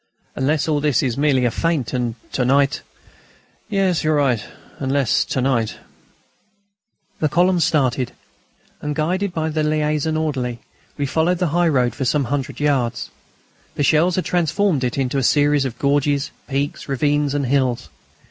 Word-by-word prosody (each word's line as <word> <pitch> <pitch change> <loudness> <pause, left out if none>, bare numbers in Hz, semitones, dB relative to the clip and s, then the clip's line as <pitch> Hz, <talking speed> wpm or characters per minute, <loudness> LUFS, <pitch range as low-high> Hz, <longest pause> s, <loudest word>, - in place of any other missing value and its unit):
"Unless 145 +4 0
all 150 -2 +1
this 145 -4 +1
is 125 -4 0
merely 140 -3 +2
a 120 - +2
feint, 165 -5 -1
and 120 -3 -1 0.2
to 130 - 0
night 140 +2 +2 0.4
..." - - -33
"Yes, 195 -5 +1
you're 155 0 +2
right, 130 -7 +1 0.4
unless 135 -2 +1
to 130 - -2
night 120 -4 0 0.7
..." 200 0 -45
The 155 - +1
column 175 +3 +3
started, 130 -6 +1 0.7
and, 150 0 -3
guided 185 +5 0
by 160 -2 -2
the 155 0 -1
liaison 155 0 0
orderly, 130 -6 -2 0.4
we 145 - -1
followed 160 +6 +1
the 180 -2 0
high 175 0 +3
road 125 -5 +2
for 135 - -4
some 145 +3 +2
hundred 140 -2 -3
yards. 130 -5 0 0.6
The 145 - 0
shells 165 +5 +3
had 185 - -1
transformed 175 -2 +1
it 125 0 -1
into 135 0 0
a - - -1
series 145 +1 +3
of 125 -3 -4
gorges, 140 0 +1 0.2
peaks, 140 +1 -3
ravines, 145 +1 +1
and 140 -1 0
hills. 130 -2 0
145 Hz, 165 wpm, -20 LUFS, 130-160 Hz, 0.7 s, column